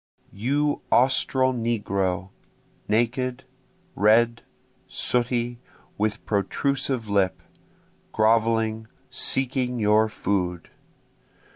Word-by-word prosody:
You 145 +8 0
Austral 130 +1 +3
negro, 100 -5 -2 0.6
naked, 125 +3 0 0.5
red, 115 +3 +3 0.5
sooty, 120 -1 -1 0.4
with 105 0 -2
protrusive 125 +3 -1
lip, 100 -2 +1 0.7
groveling, 110 -1 +1 0.2
seeking 130 -1 0
your 110 0 +3
food! 90 -5 -2
115 Hz, 70 wpm, -24 LUFS, 105-125 Hz, 0.7 s, Austral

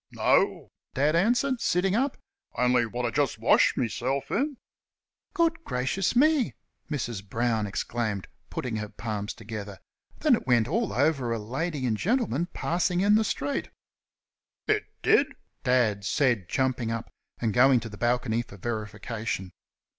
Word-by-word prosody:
"No," - - +2 0.2
Dad 145 +4 +2
answered, 240 +7 +2
sitting 185 +2 +2
up, 265 +4 0 0.4
"On'y 125 -1 +3
what 120 +2 -3
I 115 - 0
jest 135 -1 0
washed 115 - +4
meself 130 +3 -1
in." 280 +1 0 0.8
"Good 330 -1 +1
gracious 155 - -1
me!" 295 -1 +3 0.3
Mrs. 120 -9 -3
Brown 110 +1 0
exclaimed, 105 -1 -2 0.2
putting 120 -4 -3
her 105 -1 -4
palms 105 -1 -4
together, 105 -3 -7 0.4
"then 300 -3 +3
it 220 - -7
went 120 -3 +4
all 220 - 0
over 140 -3 +1
a 115 - 0
lady 135 +6 -3
an' 110 -3 +1
gentleman 185 - 0
passing 175 +1 0
in 205 +1 +4
the 220 +1 +5
street!" 145 -8 -2 1.0
"It - - +2 0.2
dud?" - - +4 0.3
Dad 115 -5 +2
said, 105 -3 +1
jumping 130 -3 0
up 115 0 -4 0.3
and 110 -3 -1
going 130 +2 +6
to 115 - -6
the 105 - -9
balcony 120 -1 +1
for 110 -4 -12
verification. 105 -2 -4
125 Hz, 145 wpm, -27 LUFS, 110-170 Hz, 1.0 s, going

